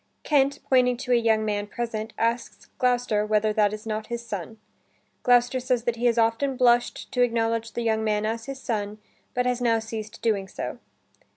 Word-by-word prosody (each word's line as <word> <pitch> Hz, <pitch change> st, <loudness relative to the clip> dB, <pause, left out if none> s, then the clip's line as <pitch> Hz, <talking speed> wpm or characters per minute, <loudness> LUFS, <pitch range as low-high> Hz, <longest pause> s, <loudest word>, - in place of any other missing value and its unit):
Kent, 280 Hz, -1 st, +2 dB
pointing 250 Hz, -2 st, +3 dB
to 250 Hz, 0 st, -4 dB
a -, -, +6 dB
young 225 Hz, -2 st, +2 dB
man 205 Hz, -1 st, -1 dB
present, 220 Hz, 0 st, -4 dB
asks 230 Hz, +1 st, -2 dB
Gloucester 245 Hz, -4 st, +2 dB
whether 215 Hz, 0 st, +1 dB
that 210 Hz, -1 st, +3 dB
is 215 Hz, +1 st, -7 dB
not 215 Hz, 0 st, -3 dB
his 235 Hz, 0 st, -5 dB
son. 215 Hz, 0 st, -6 dB, 0.6 s
Gloucester 245 Hz, +1 st, +3 dB
says 250 Hz, -2 st, 0 dB
that 240 Hz, -1 st, -1 dB
he 240 Hz, +1 st, +2 dB
has 235 Hz, 0 st, +2 dB
often 230 Hz, +4 st, +1 dB
blushed 240 Hz, -1 st, +2 dB
to 250 Hz, -, 0 dB
acknowledge 230 Hz, -1 st, +1 dB
the 235 Hz, -, -2 dB
young 220 Hz, -1 st, +1 dB
man 210 Hz, -1 st, 0 dB
as 225 Hz, +1 st, -2 dB
his 275 Hz, -1 st, -6 dB
son, 210 Hz, -4 st, -3 dB, 0.4 s
but 250 Hz, 0 st, +1 dB
has 250 Hz, 0 st, 0 dB
now 230 Hz, -2 st, +3 dB
ceased 220 Hz, -1 st, -6 dB
doing 205 Hz, -4 st, +1 dB
so. -, -, -6 dB
230 Hz, 190 wpm, -25 LUFS, 215-245 Hz, 0.6 s, a